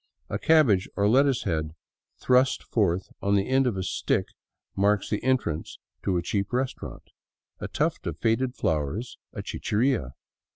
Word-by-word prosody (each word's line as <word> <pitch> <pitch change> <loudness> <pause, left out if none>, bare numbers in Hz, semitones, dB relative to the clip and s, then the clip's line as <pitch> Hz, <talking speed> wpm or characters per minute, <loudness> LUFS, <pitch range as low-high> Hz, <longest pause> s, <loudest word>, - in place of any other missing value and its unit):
A - - -1
cabbage 135 - +4
or 100 - +1
a - - +5
lettuce 135 +3 +3
head 80 -4 -2 0.4
thrust 130 +1 +3
forth 95 -4 0
on 100 0 +2
the 100 -1 +1
end 130 0 +3
of 110 -6 -1
a 95 - -2
stick - - -1 0.5
marks 100 +1 +2
the 105 - -1
entrance 125 -12 -1 0.2
to 95 -2 0
a 85 - -1
cheap 100 +2 -1
restaurant; 130 +1 -3 0.6
a - - -4
tuft - - -1
of 80 -2 -3
faded 120 +6 0
flowers, 80 - -2
a - - -6
chicheria. 110 - -1
105 Hz, 160 wpm, -26 LUFS, 90-130 Hz, 0.6 s, a